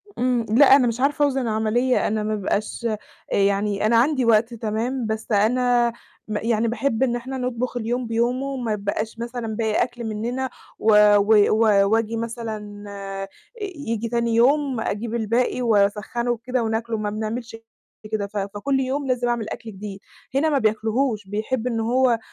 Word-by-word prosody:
إمم، 245 -2 +1
لأ، 270 +4 +7
أنا 255 -3 +4
مش 230 +1 -2
عارفة 290 +2 +2
أوزِن 270 -1 0
العملية، 230 +3 +1
أنا 215 0 -1
ما 215 0 -1
بيبقاش 215 +3 -2 0.4
يعني 200 +1 +1
أنا 230 +1 +4
عندي 260 0 +2
وقت 230 +1 +3
تمام، 230 +3 -2
بس 220 +1 -4
أنا 240 +3 +3 0.3
م 210 -1 -2
يعني 230 0 +1
باحب 240 +1 0
إن 240 -2 +1
إحنا 260 +2 -5
نطبُخ 250 0 -2
اليوم 240 +1 -2
بيومه، 240 +4 0
وما 250 -5 -2
يتبقاش 210 +2 -3
مثلًا 235 -1 -4
باقي 220 0 +1
أكل 240 -1 -6
مننا، 235 +4 -3 0.3
و 220 0 +3 0.2
و 205 0 +5
و 210 -3 +4
وآجي 225 0 +1
مثلًا 220 -3 -6
آآ، 195 -1 -6 0.3
ييجي 235 - -4
تاني 235 -1 0
يوم 270 +1 +3
أجيب 225 +2 -3
الباقي 235 +3 0
وأسخّنه 215 +2 +1
وكده 240 +1 -2
وناكله، 225 0 -1
ما 210 -1 -2
بنعملش 225 +2 -4 0.6
كده. 205 -2 -1
ف 205 - -7
فكل 205 +8 -1
يوم 270 +2 -2
لازم 245 -1 0
أعمل 235 -3 -1
أكل 225 - -7
جديد، 200 0 -8 0.4
هنا 310 +3 +3
ما 285 - +2
بياكلهوش، 220 0 0
بيحب 220 +4 -2
إن 230 -2 -1
هو 240 0 +2
230 Hz, 165 wpm, -23 LUFS, 215-250 Hz, 0.6 s, لأ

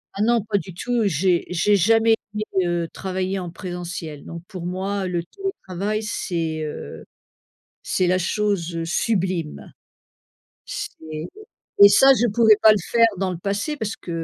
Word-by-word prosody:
Ah 200 - -3
non 230 -1 +3
pas 205 -2 0
du 185 -3 -10
tout, 245 +3 -1
j'ai 175 +1 +2
j'ai 190 +4 +2
jamais 225 +4 +4 0.2
été, 215 0 -2 0.2
heu, 170 -1 -1
travailler 190 0 -3
en 180 - -5
présentiel 175 -4 -6
non. 170 0 -8
Pour 185 -5 -8
moi 190 +1 -2
le 175 -2 -2
télétravail 215 - -4
c'est, 165 -6 -3
heu, 150 - -6 0.8
c'est 185 - 0
la 180 +1 +2
chose, 185 -3 -1
heu, 165 - -2
sublime! 180 -3 -2 0.9
C'est - - -6 0.8
et 200 - +11
ça 270 +7 +7
je 240 -2 +2
pouvais 220 0 +5
pas 220 - +8
le 210 - +1
faire 230 -1 +5
dans 190 0 -1
le 175 - -5
passé 200 - -2
parce 220 -4 -3
que, 175 - -10
190 Hz, 160 wpm, -22 LUFS, 175-215 Hz, 0.9 s, et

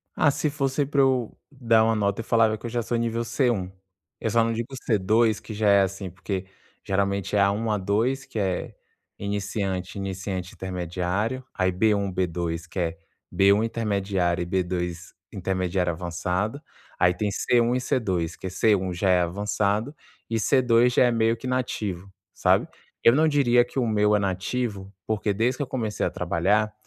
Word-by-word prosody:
Ah, 145 - +4
se 150 - -1
fosse 140 -1 0
pra 140 0 +2
eu 130 -4 +1 0.2
dar 115 -5 +3
uma 115 0 +2
nota, 100 0 0
eu - - -10
falava 115 -2 +3
que 110 - -12
eu - - -2
já 120 +1 -1
sou 120 +1 -2
nível 115 0 -1
C1. 115 -6 0 0.5
Eu 110 - -1
só 115 +1 +3
não 115 - 0
digo 115 +1 -3 0.2
C2, 110 +1 +3
que 110 - -8
já 105 0 +1
é 100 0 +6
assim 95 0 -2
porque 95 +2 -4 0.4
geralmente 100 0 -1
é - - +4
A1, 100 +3 +2
A2, 115 +8 0
que 110 - -5
é 95 -3 -2 0.4
iniciante, 100 -2 -3
iniciante-intermediário. 95 +3 -3
Aí 95 -1 +1
B1, 100 +1 +1
B2, 85 -2 -2
que 90 - -6
é 85 -1 -1 0.3
B1, 100 +2 +4
intermediário, 100 -6 -1
e - - -2
B2, 90 -1 -3 0.2
intermediário-avançado. 90 - -2 0.4
Aí 90 0 +4
tem 105 +3 -1
C1 120 +4 +2
e - - +1
C2, 95 - -1
que - - -6
é - - -3
C1, 95 -1 +1
já 95 +2 0
é 90 -1 +4
avançado, 105 - -1 0.3
e 115 - -1
C2, 120 0 +3
já - - +6
é 125 - +4
meio 115 0 +2
que 115 - -10
nativo, 105 -7 -2 0.2
sabe. - - +2 0.4
Eu 115 - +7
não 160 +2 +4
diria 125 -5 +4
que 120 - -11
o 130 - +2
meu 105 -1 +3
é - - +3
nativo, 100 +1 -2
porque 105 -1 -1
desde 120 +5 0
que 145 - -1
eu - - -6
comecei 110 -5 -3
a - - +1
trabalhar, 105 +5 0
105 Hz, 175 wpm, -25 LUFS, 95-115 Hz, 0.5 s, Eu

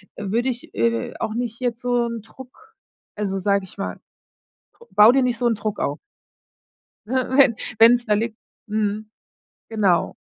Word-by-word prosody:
äh, 205 - -6
würde 240 +4 +1
ich, 245 -1 -6
äh, 115 0 0
auch 220 - -3
nicht 235 -1 -3
jetzt 245 -1 -2
so 245 -1 +1
'n 230 -2 -5
Druck 265 - -15 0.4
also 200 -2 -2
sage 200 0 +1
ich 185 - -12
mal: 195 - -4 0.9
„Bau 210 +3 +7
dir 265 0 +3
nicht 245 -1 0
so 240 - +2
'n 230 - +2
Druck 210 0 -4
auf.” - - -2 1.1
Äh, - - -8 0.3
wenn 260 -5 +6 0.2
wenn's 240 +2 +6
da 210 - +2
liegt 220 +1 -1 0.3
mhm, 210 0 -2 0.6
genau. 200 -7 +1
225 Hz, 165 wpm, -22 LUFS, 210-245 Hz, 1.1 s, Bau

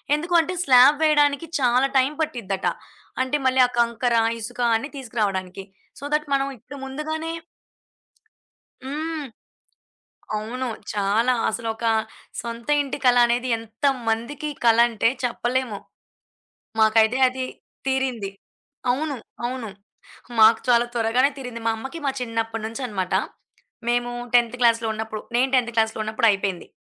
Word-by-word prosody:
ఎందుకు 335 +4 -4
అంటే 355 +3 -4
స్లాబ్ 260 +1 +7
వేయడానికి 295 -1 +3
చాలా 250 +1 +3
టైం 265 +2 +3
పట్టిద్దట. 200 -10 -2 0.5
అంటే, 260 +3 +1
మళ్ళీ 260 0 +3
ఆ - - -12
కంకర, 235 +1 +1 0.2
ఇసుక 245 +3 -8 0.2
అన్నీ 270 +6 -2
తీసుకురావడానికి. 195 -7 -3 0.4
సో, - - -13
థట్ 300 0 +1
మనం 275 0 +2
ఇప్పుడు 270 +6 -11
ముందుగానే 315 +4 -4 1.5
హ్మ్. 305 +3 -4 1.1
అవును. 250 +5 -4 0.3
చాలా. 210 +5 +2 0.2
అసలొక 225 +1 -4 0.6
సొంత 235 0 -7
ఇంటి 280 -1 -4
కల 245 -1 +6
అనేది 240 +1 0
ఎంతమందికి 235 +4 -2 0.2
కల 230 -1 +6
అంటే 230 0 +2
చెప్పలేము. 245 -2 -1 1.0
మాకైతే 220 +2 +4
అది 255 +1 -3 0.4
తీరింది. 260 -6 -1 0.6
అవును, 290 +3 -2 0.3
అవును. 245 -2 -4 0.7
మాకు 220 +1 +7
చాలా 240 -1 +4
త్వరగానే 240 +3 +2
తీరింది. 245 -3 -6
మా 225 - +4
అమ్మకి 265 +8 -7
మా 275 - +2
చిన్నప్పటి 225 -1 -3
నుంచి 230 +5 -7
అన్నమాట. 190 -4 -2 0.7
మేము 240 0 +1 0.2
టెన్త్ 240 0 +3
క్లాస్‌లో 230 -1 +3
ఉన్నప్పుడు, 220 -1 -5
నేను 260 +2 +3
టెన్త్ 240 -2 +1
క్లాస్‌లో 220 -1 +1
ఉన్నప్పుడు 220 +2 +1
అయిపోయింది. 195 -2 -2
240 Hz, 125 wpm, -23 LUFS, 225-265 Hz, 1.5 s, స్లాబ్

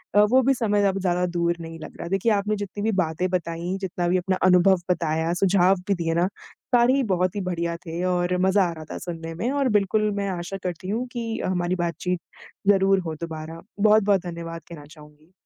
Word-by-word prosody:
अ, 205 - +7
वो 260 +1 +6
भी 270 +2 +4
समय 210 -5 +1
अब 195 0 0
ज़्यादा 180 -1 +1
दूर 170 0 +1
नहीं 165 0 -8
लग 155 - -10
रहा। - - -5
देखिए 195 +4 +1
आपने 210 0 +1
जितनी 205 0 -5
भी 220 - +2
बातें 160 +3 -2
बताई, 175 0 -2
जितना 180 -2 -2
भी 180 +2 +3
अपना 185 +1 0
अनुभव 185 +1 +5
बताया, 165 -1 0
सुझाव 190 +1 +3
भी 200 - +3
दिए 165 -2 -1
ना, 180 - +3 0.5
सारे 240 +1 +5
ही 275 0 +2
बहुत 180 +1 0
ही 205 - -2
बढ़िया 170 -2 -2
थे 170 +1 -4
और 180 0 0
मज़ा 190 +1 +4
आ - - -3
रहा 160 -1 -9
था - - -4
सुनने 165 -2 -6
में, 225 +9 -2
और 280 -2 +1
बिल्कुल 210 +2 0
मैं 200 0 -1
आशा 180 +1 -4
करती 180 0 -4
हूँ 230 +5 -1
कि 230 -2 -3
अ, - - -2
हमारी 175 -1 0
बातचीत 175 +1 -2 0.5
ज़रूर 195 -1 +5
हो 160 - -3
दोबारा। 160 0 -6 0.2
बहुत-बहुत 205 -2 +4
धन्यवाद 165 -1 -6
कहना 155 -4 -10
चाहूँगी। 150 +1 -17
180 Hz, 215 wpm, -24 LUFS, 170-200 Hz, 0.5 s, अ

